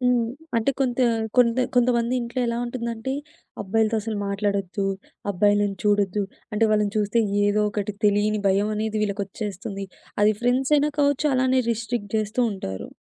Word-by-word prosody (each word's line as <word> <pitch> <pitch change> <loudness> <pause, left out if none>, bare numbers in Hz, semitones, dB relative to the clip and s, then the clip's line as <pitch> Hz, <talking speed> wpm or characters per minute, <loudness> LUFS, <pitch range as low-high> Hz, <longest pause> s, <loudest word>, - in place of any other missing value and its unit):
హ్మ్. 245 -2 +2 0.3
అంటే 230 +4 +2
కొంత 255 -2 0 0.4
కొంత 240 -1 +5 0.2
కొంతమంది 245 0 +2
ఇంట్లో 235 +2 -3
ఎలా 235 0 -1
ఉంటుందంటే, 235 0 -4 0.5
అబ్బాయిలతో 220 +3 +1
అసలు 220 0 -3
మాట్లాడొద్దు. 200 -1 -1 0.4
అబ్బాయిలను 205 +1 +2
చూడొద్దు. 205 -1 +2 0.3
అంటే 210 +2 +2
వాళ్ళని 210 -1 +2
చూస్తే 210 +2 +2 0.2
ఏదో 205 +1 +2
ఒకటి 205 0 -3
తెలియని 205 +1 +2
భయమనేది 210 +2 0
వీళ్ళకొచ్చేస్తుంది. 200 -1 -4 0.4
అది 210 +1 +5
ఫ్రెండ్స్ 255 +3 +2
అయినా 295 +1 +2
కావచ్చు, 285 +1 +2
అలానే 260 0 +3
రిస్ట్రిక్ట్ 225 -2 -3
చేస్తూ 215 +3 -1
ఉంటారు. 95 - -6
215 Hz, 135 wpm, -24 LUFS, 205-240 Hz, 0.5 s, కొంత